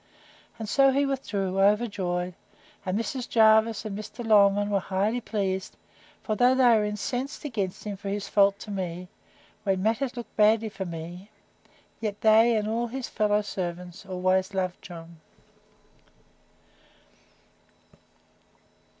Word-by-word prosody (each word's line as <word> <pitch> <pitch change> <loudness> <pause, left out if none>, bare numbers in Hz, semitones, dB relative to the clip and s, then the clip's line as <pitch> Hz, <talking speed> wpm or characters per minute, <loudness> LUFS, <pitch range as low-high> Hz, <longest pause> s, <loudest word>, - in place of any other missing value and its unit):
And 220 -1 -6
so 275 +4 +4
he 280 +2 +2
withdrew, 200 -9 -2
overjoyed; 195 -4 +1 0.5
and 185 +2 0
Mrs. 250 +2 -4
Jervis 220 0 +4
and 205 -2 -4
Mr. 215 +3 -7
Longman 205 -1 +4
were 200 - +2
highly 200 +6 -1
pleased; 190 -4 -3 0.5
for 215 - -1
though 250 +4 +4
they 255 -2 +5
were 215 - +2
incensed 245 +8 -4
against 205 -9 -3
him 205 -2 -5
for 200 +1 -6
his 200 0 -3
fault 200 -1 +3
to 210 - -8
me, 180 -2 -4 0.5
when 190 -2 0
matters 245 +4 0
looked 240 - -8
badly 220 +1 +4
for 195 -2 -6
me, 175 +3 -8 0.7
yet 210 -2 -4
they, 225 +2 +5
and 210 0 -1
all 230 +2 -1
his 255 +2 -5
fellow 210 0 +1
servants, 180 -2 -5
always 185 0 0
loved 185 -1 -2
John. 170 -1 -11
205 Hz, 135 wpm, -26 LUFS, 190-225 Hz, 0.7 s, they